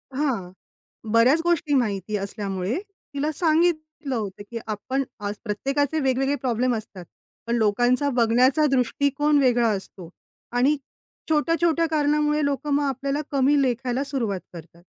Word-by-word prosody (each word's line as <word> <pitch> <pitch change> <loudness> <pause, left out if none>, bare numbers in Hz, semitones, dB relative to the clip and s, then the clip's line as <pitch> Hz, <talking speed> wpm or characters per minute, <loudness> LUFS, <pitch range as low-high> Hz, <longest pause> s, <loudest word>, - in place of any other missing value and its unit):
हां. 245 -11 -1 0.6
बऱ्याच 245 +8 +5
गोष्टी 335 -3 +1
माहिती 215 -4 0
असल्यामुळे, 195 +1 -3 0.4
तिला 290 +2 -1
सांगितलं 310 -3 0
होतं, 205 -3 -4
की 230 - -4
आपण 255 +6 -2 0.2
आज 205 - -3
प्रत्येकाचे 275 +8 -1
वेगवेगळे 270 0 +1
प्रॉब्लेम 250 -2 0
असतात. 200 -5 -8 0.4
पण 235 - +1
लोकांचा 245 +6 +2
बघण्याचा 255 +5 +3
दृष्टिकोन 280 +3 +2
वेगळा 245 -3 +3
असतो 190 -4 -5 0.4
आणि 255 +5 +3 0.5
छोट्या-छोट्या 330 +2 +2
कारणामुळे 300 0 +2
लोकं 285 +1 -2
मग 290 - +2
आपल्याला 275 +1 -1
कमी 280 +1 +3
लेखायला 255 0 0
सुरुवात 235 -9 -2
करतात. 170 0 -12
265 Hz, 125 wpm, -24 LUFS, 230-295 Hz, 0.6 s, बऱ्याच